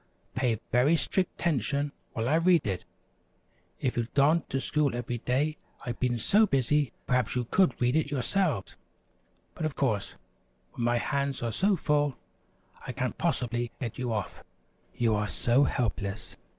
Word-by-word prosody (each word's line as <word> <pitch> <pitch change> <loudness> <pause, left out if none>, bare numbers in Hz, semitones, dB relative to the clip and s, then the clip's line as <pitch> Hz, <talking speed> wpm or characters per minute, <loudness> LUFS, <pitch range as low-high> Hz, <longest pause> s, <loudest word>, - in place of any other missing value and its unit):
Pay 125 -4 0
very 125 +7 +4
strict 185 +2 -1
'tention 145 -2 0 0.2
while 115 +1 -1
I 140 - +2
read 170 0 +4
it. 95 -3 -2 0.9
If 125 - -1
you'd 120 -1 -2
gone 155 +4 +5
to 135 - 0
school 140 0 0
every 120 0 -3
day 145 +6 0 0.3
I've 120 -2 -4
been 125 -1 +1
so 210 - +4
busy, 140 - +2
perhaps 125 0 +1
you 125 -1 0
could 185 +9 +2
read 125 +2 +2
it 155 -2 +1
yourselves; 145 - 0 0.8
but, - - -6
of 155 -2 -1
course, 110 -8 0 0.6
when 120 - -3
my 120 0 +3
hands 140 +1 -1
are 115 - -1
so 195 - +2
full, 145 -4 +1 0.7
I 125 - -3
can't 130 0 -3
possibly 120 -8 0
get 120 -2 -5
you 125 -2 -1
off, 105 -3 -3
and - - -22
you 115 -2 +4
are 105 0 0
so 125 +6 +2
helpless. 105 -6 -2
130 Hz, 165 wpm, -29 LUFS, 120-150 Hz, 0.9 s, gone